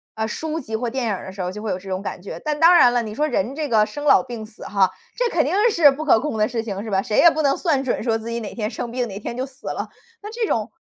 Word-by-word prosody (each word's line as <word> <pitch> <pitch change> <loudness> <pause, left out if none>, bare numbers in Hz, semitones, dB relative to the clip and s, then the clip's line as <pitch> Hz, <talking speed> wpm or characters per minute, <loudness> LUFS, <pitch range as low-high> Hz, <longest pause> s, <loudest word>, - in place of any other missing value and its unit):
呃， 220 0 -1
书 315 +6 -3
籍 225 -7 -5
或 235 +2 -2
电 250 0 -2
影 215 - 0
儿 - - -8
的 190 - -7
时 190 - -7
候， 180 0 -2
就 210 +2 -8
会 220 - -4
有 185 - -2
这 195 +1 -11
种 185 0 -2
感 200 - -6
觉。 195 - -7
但 300 -1 -2
当 335 +2 +7
然 245 -8 +6
了， 245 - +2
你 215 -2 -6
说 300 +4 +1
人 280 -4 -1
这 305 0 -2
个 215 -2 +4
生 290 +7 -7
老 190 - +6
病 230 -3 -7
死 215 - -13
哈， 195 -2 +2 0.3
这 - - +1
肯 320 - +3
定 305 - -1 0.2
是 315 -7 +6
不 300 +3 -5
可 265 - +5
控 280 -4 -3
的 215 - +2
事 235 -3 -3
情 200 -3 -5
是 220 - -6
吧？ 190 -1 +2
谁 210 - -2
也 340 - +8
不 315 - -1
能 275 -2 +2
算 295 -7 +1
准 260 - -1
说 225 -2 +1
自 225 +1 -7
己 235 0 -2
哪 220 - -7
天 215 -2 -3
生 235 - -5
病 245 0 -1
哪 200 -2 -7
天 235 - -5
就 260 - -1
死 270 +1 -14
了。 - - -3 0.3
那 420 - -8
这 455 -1 -2
种 220 -2 -1
235 Hz, 355 characters per minute, -22 LUFS, 215-295 Hz, 0.3 s, 也